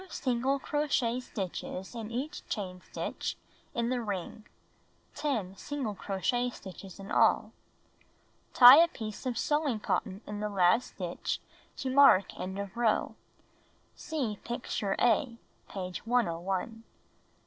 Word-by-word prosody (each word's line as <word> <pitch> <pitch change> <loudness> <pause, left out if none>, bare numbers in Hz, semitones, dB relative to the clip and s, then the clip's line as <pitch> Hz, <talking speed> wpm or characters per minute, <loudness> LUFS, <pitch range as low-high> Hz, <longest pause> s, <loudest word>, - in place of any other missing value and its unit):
Put 380 - -14
2 - - -12
single 260 +1 +1
crochet 270 -5 0
stitches 190 -4 -5
in 225 -3 -6
each 260 +6 -4
chain 185 -4 -4
stitch - - -4 0.4
in 235 -1 0
the 250 -1 0
ring 205 0 -5 0.7
(10 220 -11 -2
single 270 -5 -3
crochet 205 +6 -1
stitches 190 -3 -10
in 195 - -9
all). - - +3 1.0
Tie 250 +2 +11
a - - +3
piece 220 - -6
of 245 -3 -2
sewing 295 -6 +1
cotton 200 -1 -2
in 210 0 -5
the 210 0 -2
last 195 +4 +2
stitch 175 -2 -3 0.4
to 265 -2 -2
mark 265 -8 +6
end 190 +1 -4
of 200 -1 -5
row. 230 -2 +1 0.8
(See 260 - -3
picture 225 -4 -2
A, 240 0 +2 0.3
page 185 +2 -6
101.) 190 -8 +1 0.3
Note. - - -18
230 Hz, 135 wpm, -30 LUFS, 195-255 Hz, 1.0 s, Tie